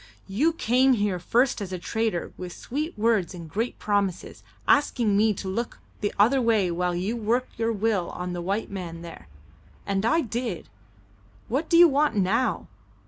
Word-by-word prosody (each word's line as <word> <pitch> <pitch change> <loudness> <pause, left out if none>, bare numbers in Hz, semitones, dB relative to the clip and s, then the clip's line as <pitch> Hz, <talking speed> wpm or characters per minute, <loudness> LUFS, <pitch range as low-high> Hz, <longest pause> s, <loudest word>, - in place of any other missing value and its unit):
"You 270 +13 +1
came 260 -2 +3
here 205 -5 0
first 245 +6 +1
as 190 -2 -5
a 185 - -3
trader 220 0 -2
with 180 -1 -7
sweet 300 +4 -4
words 210 -4 +1
and 170 -2 -8
great 225 +9 -3
promises, 200 -3 -1 0.3
asking 240 -7 +3
me 215 +2 +4
to 190 - -6
look 230 +5 -3 0.2
the 205 - -1
other 245 +6 +4
way 220 -6 +2
while 175 +1 -1
you 190 +6 -1
worked 235 +3 -1
your 225 0 +1
will 210 -4 0
on 180 0 -5
the 175 - -4
white 200 +5 -2
man 170 -4 -6
there. 170 - -10 0.6
And 195 0 -1
I 325 +9 +3
did. 235 - -4 0.8
What 280 +7 -1
do 335 - +5
you 345 0 +9
want 295 -3 +2
now? 210 +6 +1
215 Hz, 175 wpm, -25 LUFS, 185-245 Hz, 0.8 s, you